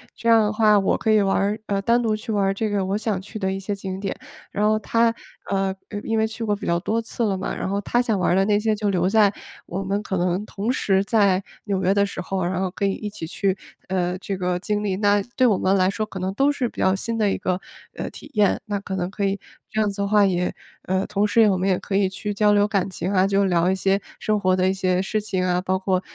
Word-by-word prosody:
这 230 - -1
样 225 -1 +7
的 210 - +1
话 215 -1 +4
我 195 - +2
可 220 - 0
以 215 -1 +5
玩 195 -1 +1
儿 205 +2 0
呃， 200 -1 0
单 235 +4 +3
独 220 -2 +1
去 215 +1 -6
玩 205 -2 +1
儿 195 - +2
这 215 +2 -2
个 200 -2 0
我 195 +2 0
想 215 -3 -1
去 215 +3 -8
的 190 -1 0
一 195 - -3
些 195 +2 -3
景 190 -1 -5
点。 195 0 -3 0.4
然 210 +1 +1
后 215 0 +3
她， 230 +1 +2 0.4
呃， 195 -1 0 0.2
呃， 205 - -4
因 225 - -1
为 220 - +2
去 225 +1 -6
过 210 -2 +1
比 205 - -8
较 170 - +2
多 220 +5 -1
次 230 +1 -4
了 200 -2 +1
嘛， 185 - -3
然 - - -3
后 200 +1 -1
她 240 - 0
想 225 -5 0
玩 180 - +2
儿 - - +3
的 195 - +4
那 205 0 +3
些 215 0 +1
就 210 -1 -1
留 180 -1 +1
在 210 -1 +4 0.3
我 185 +3 -4
们 200 +2 -1
可 190 - -2
能 180 +3 0
同 215 +3 -2
时 195 -6 +1
在 200 -4 +2 0.2
纽 195 -3 -1
约 185 +2 +3
的 200 0 +4
时 200 - -5
候， 190 0 -2
然 180 +1 -1
后 190 - 0
可 200 - -2
以 195 - +2
一 210 - -5
起 205 -5 -7
去， 190 +3 -1 0.3
呃， 180 -1 0
这 195 0 -4
个 180 -1 -1
经 210 +2 -2
历。 195 -2 0
那 205 0 +3
对 255 - +4
我 210 -5 +3
们 190 +1 +2
来 185 -1 +3
说， 215 +2 -2
可 195 -3 -8
能 185 +1 -1
都 275 +5 +3
是 265 -4 -1
比 - - -12
较 190 - +4
新 230 +4 -3
的 210 -2 +2
一 - - -1
个， 185 0 -1 0.4
呃， - - -4
体 - - -12
验。 210 -2 +3
那 205 -1 -2
可 195 -1 -5
能 180 -1 -2
可 200 - -3
以 195 0 -1 0.3
这 215 - -2
样 215 -1 +2
子 200 0 -4
的 200 - 0
话 205 0 +4
也 180 -2 0 0.3
呃， 190 +1 0
同 210 0 +1
时 230 +2 +4
也 215 - +6
我 190 - +2
们 185 +2 0
也 185 - +3
可 195 - -4
以 195 -1 +3
去 205 +2 -4
交 210 0 +3
流 205 0 +4
感 195 -2 0
情 185 0 -3
啊， 190 0 +4
就 200 0 +2
聊 175 -1 +2
一 190 - +2
些 195 +1 +1 0.2
生 215 -1 0
活 185 -2 +2
的 185 0 +2
一 - - +1
些 185 -1 +1
事 215 +3 -1
情 190 -3 -2
啊， 180 0 +1
包 185 0 0
括， 190 -1 0
200 Hz, 310 characters per minute, -23 LUFS, 190-210 Hz, 0.4 s, 样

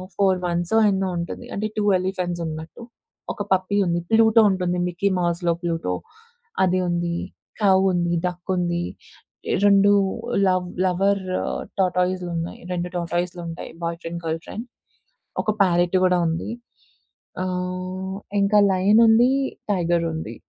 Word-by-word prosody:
4 190 -2 +2
months 175 +4 0 0.2
ఎన్నో 190 -1 0
ఉంటుంది. 170 - -5
అంటే 215 +2 -1
టు 210 - +1 0.2
ఎలిఫెంట్స్ 180 -2 -2
ఉన్నట్టు. 160 +8 -7 0.5
ఒక - - -7
పప్పీ 185 +2 0
ఉంది. 170 0 +1
ప్లూటో 225 0 +6
ఉంటుంది. 180 -1 -1
మిక్కీ 200 +3 0
మౌస్‌లో 170 0 0
ప్లూటో 165 - -1 0.7
అది 185 0 +2
ఉంది. 170 0 -1 0.4
కౌ 195 -2 +5 0.2
ఉంది, 175 -1 0
డక్ 180 +1 -4
ఉంది. 175 -1 -1 0.8
రెండు 200 0 +6 0.6
లవ్ 185 -1 +1 0.2
లవర్ 195 +2 +2 0.6
టార్టోస్ 180 0 +1
ఉన్నాయి. 165 0 -4
రెండు 175 0 -2
టార్టోస్‌లు 175 +1 -2
ఉంటాయి. 165 +1 -7
బాయ్ 170 0 -2
ఫ్రెండ్, 170 +1 -5
గర్ల్ 160 0 -1
ఫ్రెండ్ 230 +3 -6 0.8
ఒక - - 0
ప్యారట్ 175 0 +2
కూడా 180 -1 +3
ఉంది. 165 +5 -3 0.9
ఆహ్, 185 +1 -4 0.2
ఇంకా 205 +1 +4
లయన్ 200 +4 +4
ఉంది. 235 +3 +5 0.4
టైగర్ 170 -2 +1
ఉంది. 120 -8 -5
180 Hz, 130 wpm, -23 LUFS, 170-190 Hz, 0.9 s, ప్లూటో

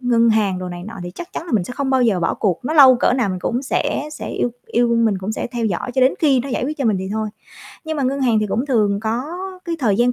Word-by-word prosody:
ngân 235 -2 +3
hàng 205 -4 +2
đồ 185 0 -5
này 175 0 -7
nọ 225 - -8
thì 175 - -6
chắc 345 - -9
chắn 335 - -5
là 285 - -6
mình 200 -6 +2
sẽ - - -7
không 275 -1 -1
bao 260 -1 +3
giờ 205 -7 +2
bỏ - - 0
cuộc, 185 -5 0
nó 305 - -1
lâu 265 -4 +8
cỡ 240 - +2
nào 245 -5 +1
mình 185 - -2
cũng 245 +7 -1
sẽ 290 +2 -1
sẽ - - -6
yêu 245 - -1 0.2
yêu 240 0 +1
mình 220 -4 +2
cũng 195 +4 -4
sẽ - - -3
theo 240 -2 -2
dõi 215 +5 -3
cho 260 - +1
đến 260 +1 +4
khi 275 -5 +3
nó 275 - -6
giải 250 - -1
quyết 305 +2 -4
cho 270 - -1
mình 215 -4 +2
thì 190 0 -4
thôi. 220 0 -2 0.6
Nhưng 315 -1 -3
mà 280 - -1
ngân 270 +2 0
hàng 235 -4 +3
thì 215 - 0
cũng 235 +7 -1
thường 210 -6 +1
có 230 +5 -2 0.4
cái 335 -1 -3
thời 215 -7 +2
gian 245 +1 +3
235 Hz, 310 wpm, -20 LUFS, 210-265 Hz, 0.6 s, lâu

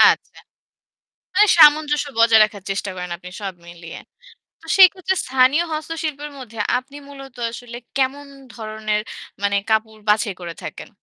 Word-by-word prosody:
আচ্ছা। - - +4 1.0
মানে 420 - +5
সামঞ্জস্য 295 -1 +5
বজায় 230 -1 +6
রাখার 210 -2 -4
চেষ্টা 195 0 -2
করেন 180 -1 -6
আপনি 180 +1 -11
সব 195 -2 -4
মিলিয়ে। 170 -1 -10 0.6
তো - - -17
সেক্ষেত্রে 380 0 +5
স্থানীয় 265 +5 +3
হস্তশিল্পের 305 -2 -5
মধ্যে 230 -4 -10 0.2
আপনি 265 +3 -9
মূলত 270 -2 -12 0.2
আসলে 240 0 -9 0.2
কেমন 275 +2 -1 0.3
ধরনের 215 -1 -3 0.4
মানে 200 0 +1
কাপড় 220 0 0
বাছাই 210 -2 +2
করে 170 -1 -6
থাকেন? - - -8
235 Hz, 135 wpm, -20 LUFS, 210-290 Hz, 1.0 s, বজায়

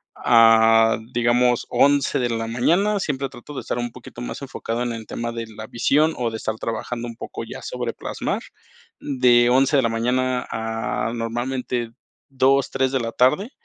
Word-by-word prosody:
a 115 -1 +5
digamos, 120 0 +2
11 140 -1 +3
de 120 -1 0
la 115 -1 -2
mañana, 180 - +1
siempre 140 -5 -2
trato 145 +4 -11
de - - -4
estar 120 - -3
un 120 -1 -3
poquito 120 0 -11
más 120 - -6
enfocado 120 -3 -4
en 120 -1 -2
el 110 -1 -8
tema 115 0 -4
de 115 -1 -5
la 110 0 -9
visión, 150 +6 +2
o 120 -2 -1
de 110 - -4
estar 110 - -3
trabajando 115 +1 -4
un 115 - -8
poco - - -7
ya - - -9
sobre - - -4
plasmar. - - -4 0.6
De 125 -3 +3
11 135 +3 +3
de 135 - +5
la 115 - +2
mañana, 125 +2 0
a 115 0 -2
normalmente 120 +1 -3 0.4
2, 135 0 +2
3 130 0 0
de 135 - 0
la 115 0 -3
tarde, 150 - +2
120 Hz, 180 wpm, -22 LUFS, 115-130 Hz, 0.6 s, a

